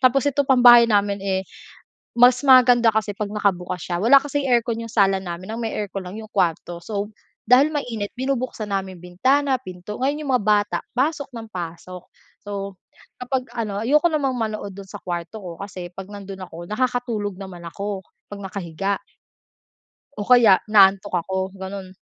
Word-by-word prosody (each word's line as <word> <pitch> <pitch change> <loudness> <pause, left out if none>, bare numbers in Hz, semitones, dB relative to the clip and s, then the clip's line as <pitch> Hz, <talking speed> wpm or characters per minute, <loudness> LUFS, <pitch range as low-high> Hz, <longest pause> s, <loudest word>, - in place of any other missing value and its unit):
Tapos 265 +1 +3
eto 285 0 +1
pang 255 -2 +4
bahay 240 -1 +9
namin 200 -1 +1
eh, 190 -1 -1 0.7
mas 245 +1 +6
maganda 245 -3 +6
kasi 215 -1 0
'pag 210 -1 -3
nakabukas 180 -4 -1
siya, 175 -1 -3
wala 275 +5 +7
kasing 285 -1 -2
aircon 235 -1 +1
yung 230 - -9
sala 195 -2 +3
namin, 180 +1 -7
ang - - -5
may 225 - -3
aircon 200 -2 -4
lang 190 +4 -7
yung 215 - -12
kuwarto. 175 -2 -1
So, 205 +2 -4 0.4
dahil 275 +6 +5
mainit 225 -8 -4
binubuksan 255 -4 -3
namin 190 -3 -4
bintana, 260 +10 +1
pinto, 185 -3 -9
ngayon 285 +4 -1
yung 275 - -3
mga 210 - -3
bata, 205 -1 +2 0.2
pasok 285 +2 0
ng 225 -1 -8
pasok. 180 0 -7 0.3
So, 200 -2 -6 0.4
kapag 250 -1 -3
ano, 210 -3 -3
ayoko 300 +8 +3
namang 275 -5 -1
manood 215 -2 -3
dun 200 -1 -9
sa - - -10
kuwarto 175 +4 -5
ko 180 - -7
kasi 185 -3 -7
'pag 190 +1 -8
nandun 195 -1 -8
ako 170 +1 -10
nakakatulog 235 -3 -1
naman 185 -3 -9
ako, 200 +2 -5 0.3
'pag 205 - -7
nakahiga. 195 0 -3 1.2
O - - -3
kaya 235 -7 +6
inaantok 195 -1 +5
ako, 190 0 -2
ganon. 190 -1 -8
205 Hz, 170 wpm, -22 LUFS, 190-245 Hz, 1.2 s, bahay